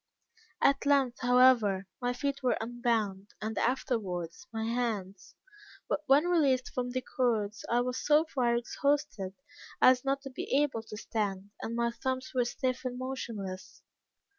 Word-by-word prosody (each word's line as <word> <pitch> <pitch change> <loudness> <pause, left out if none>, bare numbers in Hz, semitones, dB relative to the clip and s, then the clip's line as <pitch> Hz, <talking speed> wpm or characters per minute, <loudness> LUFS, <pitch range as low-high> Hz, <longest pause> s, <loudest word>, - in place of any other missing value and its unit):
At 275 0 +3
length, 270 -4 +3
however, 245 -6 +5 0.2
my 245 0 +1
feet 280 +2 -2
were 255 -2 +2
unbound, 225 -4 -1
and 220 +1 -4
afterwards 225 - -2
my 220 -1 -3
hands; 210 -5 -3 0.5
but - - 0
when 280 +4 +5
released 280 -8 +2
from 250 -1 -2
the 255 +1 -2
cords, 220 -5 -1
I 240 +1 +3
was 250 +1 -3
so 300 +2 +4
far 250 -6 +1
exhausted 240 -5 -1 0.4
as 255 -1 +6
not 275 0 0
to 270 - -7
be 255 - -6
able 265 -6 -2
to 215 -1 -9
stand, 205 -3 -3
and 230 - -4
my 235 0 +1
thumbs 260 +2 -3
were 250 -2 +2
stiff 255 +1 -2
and 250 -1 -3
motionless. 220 -8 -6
245 Hz, 150 wpm, -30 LUFS, 220-260 Hz, 0.5 s, as